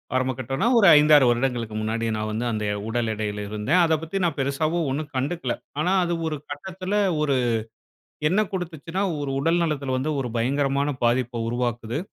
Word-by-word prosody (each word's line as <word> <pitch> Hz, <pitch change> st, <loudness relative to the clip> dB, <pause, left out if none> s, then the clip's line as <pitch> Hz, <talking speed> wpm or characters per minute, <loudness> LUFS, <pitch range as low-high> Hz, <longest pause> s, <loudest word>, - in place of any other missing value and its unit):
ஆரம்ப 130 Hz, 0 st, +1 dB
கட்டம்னா, 135 Hz, -, -1 dB
ஒரு 200 Hz, -, +6 dB
5-6 150 Hz, -2 st, +6 dB
வருடங்களுக்கு 120 Hz, -3 st, -1 dB
முன்னாடி 115 Hz, +1 st, -2 dB
நான் 110 Hz, 0 st, -2 dB
வந்து 110 Hz, +3 st, -2 dB
அந்த 105 Hz, -1 st, -2 dB, 0.2 s
உடல் 115 Hz, 0 st, -1 dB
எடையில 105 Hz, -1 st, -3 dB
இருந்தேன். 110 Hz, -, +2 dB
அதை 160 Hz, -1 st, +3 dB
பத்தி 190 Hz, +4 st, -3 dB
நான் 165 Hz, -4 st, -1 dB
பெருசாவும் 155 Hz, +4 st, 0 dB
ஒண்ணும் 150 Hz, +2 st, -4 dB
கண்டுக்கல. 135 Hz, 0 st, -1 dB, 0.3 s
ஆனா 180 Hz, +4 st, +1 dB
அது 175 Hz, -, -1 dB
ஒரு 155 Hz, -, -2 dB, 0.2 s
கட்டத்தில, 185 Hz, +6 st, -4 dB, 0.3 s
ஒரு 145 Hz, -3 st, +2 dB, 0.9 s
என்ன 195 Hz, +6 st, +3 dB
கொடுத்துச்சுன்னா, 175 Hz, 0 st, -4 dB, 0.2 s
ஒரு 145 Hz, -, -3 dB
உடல் 165 Hz, +4 st, +2 dB
நலத்தில 140 Hz, -5 st, -1 dB
வந்து 140 Hz, +4 st, -1 dB
ஒரு 125 Hz, -, -3 dB
பயங்கரமான 140 Hz, +3 st, +1 dB, 0.2 s
பாதிப்ப 120 Hz, 0 st, 0 dB
உருவாக்குது. 120 Hz, +1 st, -2 dB
135 Hz, 165 wpm, -24 LUFS, 120-160 Hz, 0.9 s, ஒரு